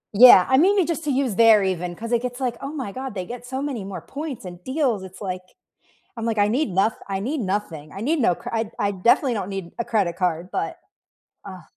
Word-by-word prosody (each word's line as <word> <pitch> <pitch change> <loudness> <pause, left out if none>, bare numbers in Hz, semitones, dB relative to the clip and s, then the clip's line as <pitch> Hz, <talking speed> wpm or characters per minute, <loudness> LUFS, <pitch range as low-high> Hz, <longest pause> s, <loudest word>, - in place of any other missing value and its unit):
Yeah, 225 -5 +9
I 260 - +4
mean, 395 +5 +4
you 375 - +4
just 330 0 -3
to 295 - -1
use 260 -5 0
there 225 -2 +6
even 180 -2 -2
'cause 230 +5 -7
it 235 -1 +2
gets, 250 0 -5
like, 250 -3 -1
"Oh 275 - -5
my 265 -9 -5
god, 260 -1 -6
they 185 - -3
get 240 +4 -8
so 260 +1 -3
many 265 -8 -3
more 195 -1 -6
points 285 -6 -7
and 175 0 -9
deals." 260 -5 0
It's, 190 0 -11
like 185 -2 -4 0.7
I'm, 230 - -6
like, 225 -2 -1
"I 205 - +4
need 250 +5 0
noth 195 +4 +1
I 195 - -1
need 260 +8 -2
nothing. 185 -7 -3
I 195 - -8
need 305 +7 +1
no 180 -9 +3
cr - - -8
I'd 225 -1 -1
I 205 0 +1
definitely 235 +7 +3
don't 200 -4 -3
need 195 -3 -5
a 235 - -1
credit 205 -8 0
card," 175 -2 -1
but - - -3 0.7
Ugh. 185 -3 -9
220 Hz, 245 wpm, -23 LUFS, 190-260 Hz, 0.7 s, Yeah